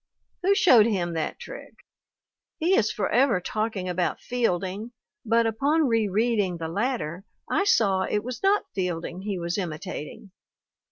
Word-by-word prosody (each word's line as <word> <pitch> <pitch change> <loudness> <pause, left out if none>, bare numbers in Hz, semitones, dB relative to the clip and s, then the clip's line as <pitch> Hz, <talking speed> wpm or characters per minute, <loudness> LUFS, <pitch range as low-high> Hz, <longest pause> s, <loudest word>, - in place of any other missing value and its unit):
Who 390 +2 +3
showed 240 - +6
him 180 -6 -1
that 160 -1 -3
trick? - - -10 0.8
He 355 +4 +2
is 220 - +2
forever 235 0 +2
talking 215 0 -3
about 180 0 -1
Fielding, 215 -2 -2 0.3
but 230 0 +2
upon 280 +8 +2
re 225 -3 +2
reading 205 -3 +1
the 165 -1 -4
latter 190 - -2 0.3
I 400 - +2
saw 200 - +3
it 210 - 0
was 250 +1 -6
not 395 +1 +3
Fielding 180 -1 -3
he 200 -1 -3
was 170 +2 -2
imitating. 160 +1 -6
210 Hz, 145 wpm, -26 LUFS, 180-245 Hz, 0.8 s, showed